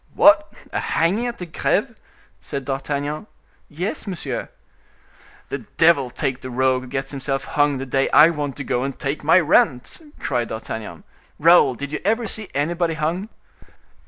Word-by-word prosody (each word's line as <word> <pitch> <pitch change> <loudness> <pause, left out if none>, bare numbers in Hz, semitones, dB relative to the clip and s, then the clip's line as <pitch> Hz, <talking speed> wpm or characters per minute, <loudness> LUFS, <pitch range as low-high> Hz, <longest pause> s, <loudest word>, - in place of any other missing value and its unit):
"What! 305 0 +6 0.2
a - - 0
hanging 200 +9 +1
at 235 - -5
the 180 - -6
Greve?" 165 - -1 0.4
said 140 -1 -6
D'Artagnan. 145 +5 -3 0.4
"Yes, 180 +8 -4
monsieur." 150 -10 -4 1.0
"The - - -3 0.2
devil 160 -6 +4
take 130 +1 -3
the 130 - -7
rogue 130 +1 +1
who 130 - -10
gets 135 +1 -4
himself 135 -1 -2
hung 145 -1 +1
the 135 - -4
day 135 +1 +1
I 155 +3 +7
want 145 -4 -4
to 140 - -4
go 125 -1 -1
and 135 -1 -4
take 140 +2 -3
my 160 +5 +6
rent!" 145 - +2 0.2
cried 120 -4 -1
D'Artagnan. 110 0 -6 0.3
"Raoul, 160 -5 +5
did 140 +3 -6
you 150 - -3
ever 225 +4 +1
see 215 -1 -4
anybody 165 +3 0
hung?" 170 +7 -2
145 Hz, 160 wpm, -22 LUFS, 135-170 Hz, 1.0 s, I